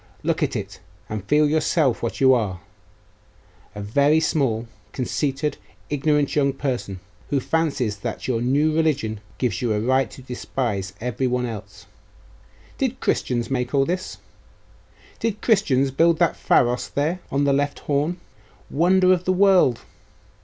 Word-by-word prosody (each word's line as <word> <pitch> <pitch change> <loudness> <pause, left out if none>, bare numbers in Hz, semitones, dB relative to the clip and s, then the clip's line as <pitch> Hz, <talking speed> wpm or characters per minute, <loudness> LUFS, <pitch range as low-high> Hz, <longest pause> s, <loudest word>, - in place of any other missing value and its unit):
Look - - 0
at - - 0
it - - -5 0.3
and 105 -3 -4
feel 150 +7 +3
yourself 155 -3 +1
what 115 - -3
you 130 -1 +6
are, 105 -7 -1 1.2
a 105 - -5
very 140 +9 +3
small, 130 -8 0 0.3
conceited, 140 +2 -2 0.3
ignorant 145 0 +1
young 140 -2 +2
person, 125 -9 -3 0.3
who 140 - +1
fancies 140 -9 -1
that 115 +2 -5
your 120 -3 0
new 145 +5 +2
religion 140 -10 0 0.2
gives 120 -7 -1
you 120 -3 +1
a 105 - 0
right 130 +4 +1
to 130 - -12
despise 120 -6 -3
every 125 +2 -1
one 125 0 0
else. 105 -4 -8 0.9
Did - - -1
Christians 120 0 -1
make 125 +1 -1
all 135 0 +4
this? 180 +3 -3 1.0
Did 220 -2 -2
Christians 140 - +2
build 165 +4 +3
that 170 0 +2
Pharos 120 0 +2
there 155 +6 -1
on 140 +1 0
the 140 -1 +3
left 145 +1 -1
horn 150 +5 -1 0.5
wonder 185 +4 +4
of 180 -1 -2
the 185 - +2
world? 185 -10 +4
135 Hz, 145 wpm, -23 LUFS, 120-155 Hz, 1.2 s, you